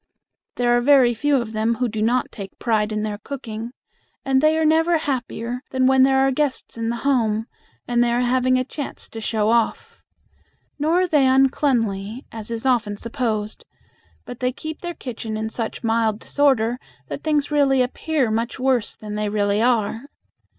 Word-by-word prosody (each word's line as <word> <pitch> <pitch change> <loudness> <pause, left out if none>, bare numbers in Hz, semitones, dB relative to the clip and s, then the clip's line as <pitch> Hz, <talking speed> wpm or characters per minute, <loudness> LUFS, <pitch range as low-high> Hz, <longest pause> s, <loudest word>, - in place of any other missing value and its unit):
There 240 -1 +2
are 240 - +2
very 260 -2 +5
few 290 +5 +1
of 235 -4 -1
them 220 +2 +1
who 250 +1 0
do 220 -1 -4
not 240 +3 +1
take 195 -3 -9
pride 220 -2 0
in 215 0 -2
their 210 -1 -3
cooking, 230 -2 -6 0.6
and 265 -1 +3
they 310 +1 +3
are 320 - +2
never 325 +2 +3
happier 250 -4 -3
than 260 -1 +1
when 265 0 +5
there 265 0 +5
are 270 - +2
guests 280 0 -2
in 230 0 -2
the 235 - -1
home 225 -5 +1 0.4
and 240 0 +2
they 240 - +1
are 240 +1 +1
having 255 +1 +2
a 255 - +1
chance 280 +2 -7
to 225 - -8
show 215 -1 0
off. 235 -1 0 0.8
Nor 325 +5 +2
are 370 - +1
they 295 -5 +3
uncleanly, 255 -5 +1
as 220 -1 -8
is 230 +1 -4
often 230 -5 +1
supposed, 225 -3 -3 0.6
but 245 - -9
they 250 0 0
keep 315 +4 -7
their 345 -1 -5
kitchen 225 -3 -5
in 220 0 -3
such 225 +2 -4
mild 225 -2 +1
disorder 250 -5 +1 0.3
that - - -6
things 300 -2 0
really 275 -3 +3
appear 265 -1 -1
much 230 +2 -2
worse 255 -4 0
than 210 -1 -8
they 210 0 -1
really 205 0 +1
are. 230 0 +1
240 Hz, 185 wpm, -22 LUFS, 220-270 Hz, 0.8 s, very